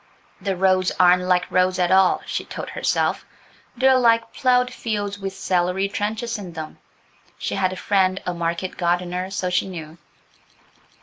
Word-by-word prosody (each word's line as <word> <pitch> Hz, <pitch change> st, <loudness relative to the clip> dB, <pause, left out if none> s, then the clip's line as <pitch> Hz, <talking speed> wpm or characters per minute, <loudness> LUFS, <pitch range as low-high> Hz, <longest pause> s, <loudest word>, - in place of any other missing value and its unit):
"The 195 Hz, -2 st, -1 dB
roads 185 Hz, 0 st, +2 dB
aren't 180 Hz, 0 st, +6 dB
like 180 Hz, 0 st, +2 dB
roads 185 Hz, 0 st, +2 dB
at 180 Hz, -1 st, +1 dB
all," 190 Hz, -1 st, +4 dB
she -, -, -3 dB
told -, -, -7 dB
herself, -, -, 0 dB, 0.5 s
"they're 260 Hz, +1 st, +5 dB
like 230 Hz, -1 st, +3 dB
ploughed 250 Hz, -1 st, +2 dB
fields 205 Hz, -4 st, -3 dB
with 195 Hz, -1 st, -4 dB
celery 180 Hz, +2 st, 0 dB
trenches 220 Hz, +3 st, -3 dB
in 180 Hz, -4 st, -8 dB
them"–she 160 Hz, -1 st, -9 dB
had 185 Hz, -1 st, +1 dB
a -, -, -5 dB
friend 190 Hz, -1 st, +1 dB
a 180 Hz, -, -2 dB
market 170 Hz, +2 st, -3 dB
gardener, 180 Hz, +1 st, -1 dB
so 185 Hz, -2 st, -2 dB
she 180 Hz, +1 st, +1 dB
knew. 165 Hz, -3 st, -8 dB
185 Hz, 150 wpm, -22 LUFS, 180-205 Hz, 0.5 s, aren't